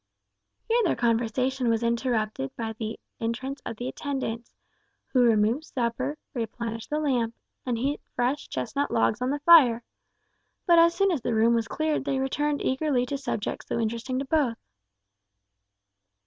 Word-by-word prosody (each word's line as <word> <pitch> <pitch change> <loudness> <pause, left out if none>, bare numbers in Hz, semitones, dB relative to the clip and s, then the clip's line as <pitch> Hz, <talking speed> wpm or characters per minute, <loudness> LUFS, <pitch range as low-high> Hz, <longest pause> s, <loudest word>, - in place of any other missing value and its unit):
Here 465 +1 +3
their 360 - +2
conversation 240 +2 +1
was 230 0 +1
interrupted 230 - -1
by 225 -1 -4
the 220 0 -5 0.2
entrance 260 +5 -3
of - - -4
the 245 - -4
attendants, 255 -5 -4 0.6
who 255 - +3
removed 230 +4 +3
supper, 255 +1 -2 0.2
replenished 230 -2 -4
the 300 - 0
lamp, 245 -7 0 0.3
and 240 -2 0
heaped 275 +5 -2
fresh 260 +4 -1
chestnut 130 - -2
logs 230 +3 +1
on 250 - 0
the 285 - 0
fire. 270 -8 +7 0.8
But 340 -2 +6
as 335 0 +5
soon 395 -1 +3
as 315 -7 -1
the 235 - -1
room 225 +2 +4
was 230 -1 +1
cleared 310 +1 -1
they 280 -1 0
returned 290 +2 -1
eagerly 260 -2 +1
to 280 +3 -3
subjects 225 -6 -3
so - - -2
interesting 235 +3 -2
to 275 - -2
both. 270 -5 +1
250 Hz, 155 wpm, -26 LUFS, 230-285 Hz, 0.8 s, fire